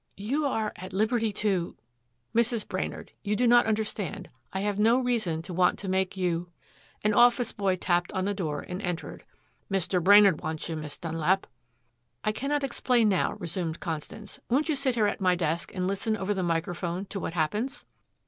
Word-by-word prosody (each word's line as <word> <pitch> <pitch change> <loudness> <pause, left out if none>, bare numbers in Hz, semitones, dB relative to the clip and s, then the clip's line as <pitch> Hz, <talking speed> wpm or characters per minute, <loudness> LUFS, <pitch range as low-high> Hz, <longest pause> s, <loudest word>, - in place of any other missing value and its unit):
"You 270 +10 0
are 220 -5 -1
at 185 +1 -8
liberty 220 +2 +1
to 195 -4 -1 0.3
" 120 - -38
"Mrs. 235 -1 +2
Brainard. - - -4
You 210 0 0
do 245 - +2
not 240 0 +6
understand. 215 -5 -2 0.2
I 190 - -2
have 205 0 -1
no 225 +3 +5
reason 220 -11 0
to 180 - -7
want 180 +1 +3
to 200 - -6
make 190 +1 0
you 175 -1 -1 0.3
" - - -30
An 210 0 +3
office 240 +1 +5
boy 195 -2 0
tapped 175 -1 0
on 190 -1 -1
the 205 - 0
door 155 -7 -3
and 180 +2 -6
entered. 175 -4 -5 0.5
"Mr. 185 -2 0
Brainard 200 -3 +7
wants 155 0 -3
you, 165 - -3
Miss 150 -2 -6
Dunlap." 165 +3 0 0.8
"I 215 - +2
cannot 280 +6 -1
explain 245 -3 +2
now," 190 - +1
resumed 170 -1 -4
Constance. 185 +6 -6
"Won't 285 +7 +2
you 310 - +2
sit 265 -2 0
here 220 -3 +3
at 205 - -1
my 180 -1 +4
desk 165 -2 -1
and 185 -1 -2
listen 205 +3 0
over 200 0 -1
the 190 - -2
microphone 175 +2 -2
to 195 - -5
what 165 - -4
happens!" 210 - -1
195 Hz, 190 wpm, -28 LUFS, 175-220 Hz, 0.8 s, Brainard